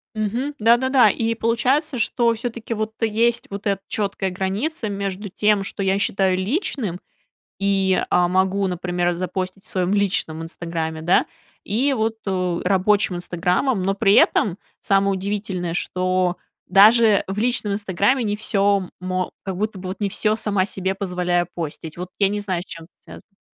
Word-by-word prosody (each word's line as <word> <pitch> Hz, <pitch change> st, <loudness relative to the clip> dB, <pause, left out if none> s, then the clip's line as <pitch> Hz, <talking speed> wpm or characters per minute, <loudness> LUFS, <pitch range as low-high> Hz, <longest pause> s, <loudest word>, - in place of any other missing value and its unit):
Мгм. 235 Hz, +7 st, -2 dB
Да-да-да. 245 Hz, +4 st, +5 dB
И 230 Hz, 0 st, 0 dB
получается, 250 Hz, +6 st, +1 dB
что 235 Hz, 0 st, +2 dB
всё-таки, 230 Hz, 0 st, -5 dB
вот, 215 Hz, 0 st, -3 dB
есть 230 Hz, +2 st, +1 dB
вот 200 Hz, +1 st, -7 dB
эта 195 Hz, -1 st, 0 dB
четкая 200 Hz, -2 st, -2 dB
граница 205 Hz, -, -2 dB
между 200 Hz, 0 st, -4 dB
тем, 210 Hz, +1 st, +2 dB
что 195 Hz, -, -4 dB
я 195 Hz, +1 st, +2 dB
считаю 190 Hz, -2 st, +1 dB
личным. 210 Hz, -, -2 dB, 0.6 s
И, 195 Hz, -1 st, +2 dB
а, 180 Hz, 0 st, +3 dB
могу, 190 Hz, +2 st, +1 dB
например, 175 Hz, 0 st, -1 dB
запостить 185 Hz, +2 st, -4 dB
в -, -, -13 dB
своем 185 Hz, +1 st, 0 dB
личном 195 Hz, -5 st, 0 dB
"Инстаграме", 165 Hz, -1 st, -4 dB
да. 175 Hz, +3 st, +3 dB, 0.4 s
И 255 Hz, +8 st, +1 dB
вот, 225 Hz, -1 st, 0 dB
у 180 Hz, -2 st, -1 dB
рабочим 195 Hz, +1 st, +2 dB
"Инстаграмом", 180 Hz, +6 st, 0 dB
но 195 Hz, +1 st, +1 dB
при 200 Hz, 0 st, +3 dB
этом 195 Hz, -3 st, +4 dB, 0.2 s
самое 195 Hz, 0 st, +2 dB
удивительное, 190 Hz, -3 st, -3 dB
что 185 Hz, -1 st, 0 dB, 0.3 s
даже 215 Hz, +2 st, +6 dB
в 195 Hz, +1 st, -4 dB
личном 225 Hz, -3 st, 0 dB
"Инстаграме" 205 Hz, +5 st, +1 dB
не 205 Hz, -1 st, -1 dB
всё 200 Hz, -3 st, +1 dB
мо 185 Hz, 0 st, -2 dB
как 190 Hz, -2 st, -4 dB
будто 215 Hz, -1 st, -2 dB
бы 185 Hz, 0 st, -6 dB
вот 190 Hz, -, -6 dB
не 205 Hz, -, 0 dB
всё 215 Hz, +2 st, +1 dB
сама 205 Hz, -4 st, +1 dB
себе 190 Hz, -1 st, -2 dB
позволяю 180 Hz, -2 st, 0 dB
постить. 160 Hz, -1 st, -6 dB
Вот 180 Hz, 0 st, -5 dB
я 195 Hz, -1 st, +3 dB
не 205 Hz, 0 st, -2 dB
знаю, 185 Hz, -4 st, -2 dB
с -, -, -20 dB
чем 165 Hz, -1 st, -8 dB
это -, -, -28 dB
связано. 195 Hz, -1 st, -16 dB
195 Hz, 165 wpm, -22 LUFS, 185-215 Hz, 0.6 s, даже